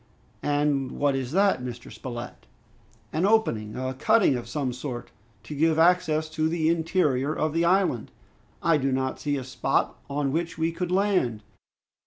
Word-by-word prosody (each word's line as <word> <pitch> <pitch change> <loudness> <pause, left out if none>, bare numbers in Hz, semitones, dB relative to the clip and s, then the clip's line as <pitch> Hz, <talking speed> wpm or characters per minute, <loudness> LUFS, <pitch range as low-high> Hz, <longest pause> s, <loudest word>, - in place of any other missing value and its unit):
"And 145 -2 0
what 145 -1 +1
is 130 -1 -3
that, 195 -5 +3
Mr. 125 -1 -7
Spilett?" 120 -1 -8 0.7
"An 160 - 0
opening, 150 - +2
a 130 0 -3
cutting 195 - +3
of 120 -1 -5
some 135 -2 -2
sort, 125 -1 -6 0.3
to 150 - -7
give 160 +2 +2
access 160 -2 +3
to 160 0 0
the 160 -1 +1
interior 160 -4 +1
of 155 -1 0
the 165 +1 +2
island. 180 - +2 0.5
I 165 -2 +4
do 135 -1 0
not 130 0 -1
see 145 -1 -1
a 135 - -4
spot 130 - -1
on 140 -1 -1
which 165 +3 -2
we 165 +1 +1
could 180 +1 -3
land." 185 - +1
150 Hz, 165 wpm, -26 LUFS, 130-165 Hz, 0.7 s, I